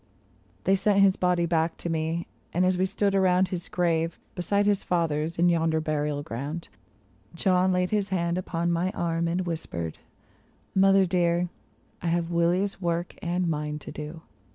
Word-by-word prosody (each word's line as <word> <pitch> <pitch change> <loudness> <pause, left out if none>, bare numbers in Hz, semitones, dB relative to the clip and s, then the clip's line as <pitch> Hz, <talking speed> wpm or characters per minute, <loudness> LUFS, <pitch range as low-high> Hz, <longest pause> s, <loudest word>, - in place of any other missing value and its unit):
They 195 - +4
sent 200 +1 +3
his 195 -1 +5
body 180 -1 +2
back 165 -1 0
to - - -5
me, 165 +1 -1 0.3
and 180 +1 +3
as 185 0 +3
we 185 +1 +1
stood 200 +1 0
around 185 -1 +3
His 180 -2 -5
grave, 165 -2 0 0.2
beside 200 +3 +1
his 205 -1 +2
father's, 165 -2 0
in 175 +1 +4
yonder 165 -2 +2
burial 150 -2 -1
ground, 145 +7 -5 0.7
John 185 +1 +3
laid 180 0 +1
his 205 -2 0
hand 170 -2 0
upon 170 -1 -1
my 170 +2 +1
arm 170 0 0
and 175 +2 0
whispered, 85 - -4 0.4
" - - -35 0.3
Mother 195 0 +5
dear, 175 -1 +1 0.5
I 170 - -3
have 170 0 0
Willy's 180 +4 +1
work 170 0 -1
and 175 +1 0
mine 150 -2 -2
to 150 - -9
do. 155 +2 -7
170 Hz, 170 wpm, -27 LUFS, 165-185 Hz, 0.7 s, his